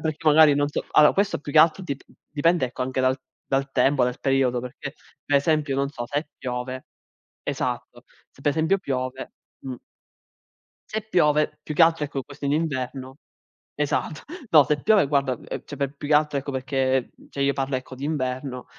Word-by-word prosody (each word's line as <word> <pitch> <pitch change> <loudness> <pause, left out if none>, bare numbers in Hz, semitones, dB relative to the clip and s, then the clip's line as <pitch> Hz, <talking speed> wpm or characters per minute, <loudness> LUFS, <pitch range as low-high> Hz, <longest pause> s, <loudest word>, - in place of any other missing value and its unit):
perché 155 +1 -3
magari 150 -1 +7
non 145 0 +1
so 150 - -3
alla 150 -1 +7
questo 200 +1 +1
più 145 - -7
che 155 - +5
altro 165 +4 +5
dip 140 -6 -5 0.3
dipende 160 0 +2
ecco 125 +1 -5
anche 130 +1 -1
dal 130 +1 +2 0.3
dal 135 0 0
tempo, 135 -2 +3
dal 125 0 -3
periodo 135 -2 +2
perché 125 +3 -7 0.3
per 145 - +2
esempio, 150 -1 +1
non 140 0 0
so, 120 -4 -6
se 145 +4 -3
piove 130 0 -4 0.6
esatto, - - -4 0.3
se - - -21
per 145 - +3
esempio 160 +6 +2
piove 130 -5 -4 0.3
mh, 130 -1 -6 1.1
se 220 - -3
piove 150 -4 +2
più 155 - -5
che 165 - +4
altro 165 -2 +2
ecco 140 -1 -4
questo 145 +1 -9
in 140 - +1
inverno 135 -3 -3 0.6
esatto. 150 +1 -1 0.3
No, 155 -3 +8
se 145 +1 0
piove 215 -6 +5
guarda, 140 -2 +1
uhm, 120 - -7
cioè 145 - -8
per 140 +1 -2
più 145 - -7
che - - +4
altro 150 -1 +2
ecco 140 +1 -6
perché 130 -1 0 0.2
cioè, 140 - -5
io 140 0 +2
parlo 135 0 -1
ecco 130 0 -9
d'inverno, 130 -2 -3
140 Hz, 185 wpm, -24 LUFS, 130-150 Hz, 1.1 s, No